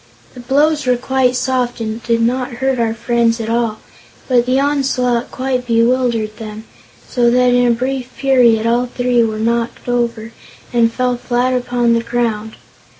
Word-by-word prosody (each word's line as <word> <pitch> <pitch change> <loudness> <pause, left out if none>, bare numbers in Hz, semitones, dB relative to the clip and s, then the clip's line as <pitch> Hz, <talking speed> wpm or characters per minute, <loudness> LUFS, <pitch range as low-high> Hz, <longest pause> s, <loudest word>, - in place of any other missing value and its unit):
The - - -11
blows 290 +3 +1
were 250 -1 +3
quite 255 0 +1
soft 250 -1 -1
and 220 0 -4
did 230 0 0
not 250 +1 -1
hurt 265 +1 -1
our 225 -1 0
friends 235 0 +1
at 225 0 -3
all, 230 -2 0 0.5
but 245 -2 +2
the 260 +1 +2
onslaught 265 -4 0
quite 255 -1 -3
bewildered 230 -2 +1
them, 215 -1 -8 0.4
so 240 -1 +2
that 250 0 +3
in 245 0 +3
a 235 - +3
brief 255 +1 -3
period 245 -5 +3
all 240 +2 +1
three 245 -1 +1
were 220 -1 -2
knocked 230 +2 -2
over 235 -2 -2 0.4
and 230 -1 +3
fell 250 0 -1
flat 245 +1 0
upon 245 -1 +1
the 230 - +1
ground. 230 -2 -2
240 Hz, 165 wpm, -16 LUFS, 230-255 Hz, 0.5 s, were